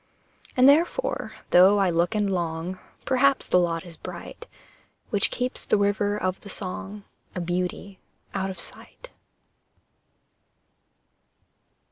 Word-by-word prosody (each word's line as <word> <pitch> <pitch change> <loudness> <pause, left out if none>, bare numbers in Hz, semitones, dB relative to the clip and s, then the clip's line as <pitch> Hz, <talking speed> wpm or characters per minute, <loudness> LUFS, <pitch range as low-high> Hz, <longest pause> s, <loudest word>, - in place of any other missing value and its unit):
And 255 +1 +7
therefore, 335 - +2 0.2
though 190 +3 +7
I 195 -3 +3
look 170 +6 +1
and 210 -1 +1
long, 170 +1 -3 0.3
Perhaps 270 +1 +3
the 180 - +4
lot 165 -1 -1
is 170 -2 -10
bright - - -9 0.6
Which 205 -2 +2
keeps 250 0 -3
the - - +2
river 205 0 +1
of 185 -2 -2
the 200 - -11
song 200 +2 -5 0.3
A - - -2
beauty 180 +2 -3 0.3
out 190 0 -1
of 190 - -7
sight. - - -10
195 Hz, 120 wpm, -25 LUFS, 180-210 Hz, 0.6 s, And